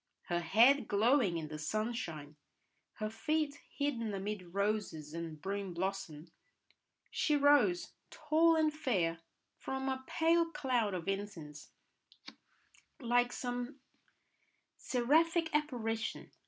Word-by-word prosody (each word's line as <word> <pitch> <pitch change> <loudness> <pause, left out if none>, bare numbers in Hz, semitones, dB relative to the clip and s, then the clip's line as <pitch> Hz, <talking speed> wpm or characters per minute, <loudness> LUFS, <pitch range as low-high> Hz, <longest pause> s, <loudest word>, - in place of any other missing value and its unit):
Her 175 0 +1
head 230 +9 +4
glowing 215 -3 +3
in 160 -2 -4
the 155 0 -7
sun 215 +9 -1
shine, 155 - -6 0.6
her 215 - -3
feet 305 +3 -1
hidden 235 -8 -2
amid 195 -2 -5
roses 200 -7 -1
and 165 -2 -6
broom 195 +1 -4
blossom, 175 -4 -4 0.8
she 300 -2 +2
rose, 280 -11 +3 0.2
tall 320 +2 +3
and 310 -1 +2
fair, 185 - 0 0.4
from 265 0 -3
a 260 0 -3
pale 330 +1 +2
cloud 255 - 0
of 175 -1 -5
incense, 195 -7 -5 1.3
like 245 -1 +2
some 245 +3 -4 1.0
seraphic 320 +6 +2
apparition. 240 -7 -2
225 Hz, 110 wpm, -34 LUFS, 180-285 Hz, 1.3 s, head